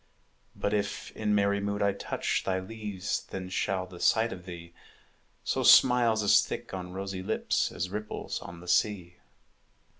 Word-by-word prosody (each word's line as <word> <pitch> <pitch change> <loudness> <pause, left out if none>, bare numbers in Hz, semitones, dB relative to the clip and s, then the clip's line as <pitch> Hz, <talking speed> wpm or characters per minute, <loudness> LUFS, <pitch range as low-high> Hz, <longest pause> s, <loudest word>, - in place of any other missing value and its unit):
But 100 - -1
if 105 -1 -2
in 105 -1 0
merry 100 0 +2
mood 100 0 -1
I 100 -1 +2
touch 100 - -2
Thy 95 -1 0
leaves, 105 0 -4
then 95 -1 -5
shall 95 0 -1
the 90 -1 -12
sight 115 +5 +3
of 90 -1 -11
thee 85 -1 -9 0.7
Sow - - -1
smiles 120 -4 +6
as 100 - +6
thick - - -6
on 90 -1 -5
rosy 95 0 -5
lips 105 +4 0
As 90 +1 -4
ripples 105 +1 -4
on 85 0 -9
the 90 - -12
sea. 90 -1 +1
100 Hz, 160 wpm, -29 LUFS, 90-105 Hz, 0.7 s, smiles